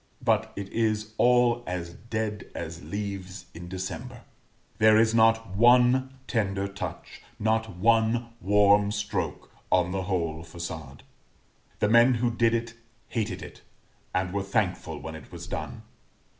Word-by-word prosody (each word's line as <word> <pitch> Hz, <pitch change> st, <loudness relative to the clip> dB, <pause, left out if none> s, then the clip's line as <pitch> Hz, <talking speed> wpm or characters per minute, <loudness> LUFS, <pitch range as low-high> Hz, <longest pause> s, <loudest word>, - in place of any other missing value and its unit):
But 110 Hz, -2 st, +2 dB
it 100 Hz, -1 st, -5 dB
is 110 Hz, -1 st, -1 dB
all 120 Hz, -1 st, +4 dB
as 85 Hz, -1 st, -4 dB
dead 110 Hz, -1 st, -4 dB
as 80 Hz, 0 st, -6 dB
leaves 100 Hz, -2 st, -5 dB
in 85 Hz, +1 st, -9 dB
December; 110 Hz, +7 st, -6 dB, 0.6 s
there 110 Hz, 0 st, +6 dB
is 110 Hz, 0 st, +4 dB
not 115 Hz, -3 st, +3 dB
one 125 Hz, +3 st, +4 dB
tender 100 Hz, -3 st, -1 dB
touch, 95 Hz, -3 st, -7 dB, 0.2 s
not 110 Hz, -2 st, 0 dB
one 115 Hz, +3 st, +2 dB
warm 100 Hz, +1 st, +4 dB
stroke, 105 Hz, -1 st, -3 dB, 0.2 s
on 90 Hz, -1 st, +3 dB
the 95 Hz, 0 st, -1 dB
whole 85 Hz, -4 st, -1 dB
façade. 80 Hz, -4 st, -7 dB, 0.8 s
The 105 Hz, -, +1 dB
men 120 Hz, +3 st, +6 dB
who 120 Hz, +1 st, +1 dB
did 115 Hz, 0 st, +2 dB
it 115 Hz, 0 st, -3 dB, 0.4 s
hated 110 Hz, -3 st, -2 dB
it, -, -, -11 dB, 0.5 s
and 90 Hz, 0 st, -1 dB
were 100 Hz, -, 0 dB
thankful 100 Hz, -1 st, -1 dB
when 80 Hz, -, -7 dB
it 80 Hz, -3 st, -11 dB
was -, -, -8 dB
done. -, -, -6 dB
105 Hz, 140 wpm, -27 LUFS, 95-115 Hz, 0.8 s, there